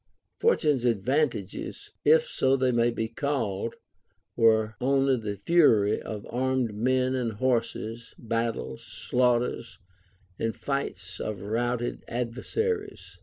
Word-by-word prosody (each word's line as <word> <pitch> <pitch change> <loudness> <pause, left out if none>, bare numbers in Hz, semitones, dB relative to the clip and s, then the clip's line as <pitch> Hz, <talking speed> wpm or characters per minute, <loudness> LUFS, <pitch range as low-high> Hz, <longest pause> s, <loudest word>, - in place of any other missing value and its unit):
Fortune's 150 - +2
advantages, 120 -1 -1
if 475 +1 +6
so 135 - +1
they 130 -1 +2
may 120 0 +3
be 115 -1 -2
called, 115 -5 -2 0.6
were 110 -1 +3
only 135 +1 +3
the 105 -4 -4
fury 110 - +4
of 105 -2 -6
armed 130 -2 0
men 130 +4 +1
and 120 -3 -1
horses, 115 -1 -2
battles, 115 - -3
slaughters, 120 -3 0 0.6
and 115 0 -2
flights 100 -10 -4
of 100 -3 -4
routed 120 +3 -1
adver 120 +1 -3
saries. 440 -3 -3
120 Hz, 115 wpm, -27 LUFS, 110-130 Hz, 0.6 s, if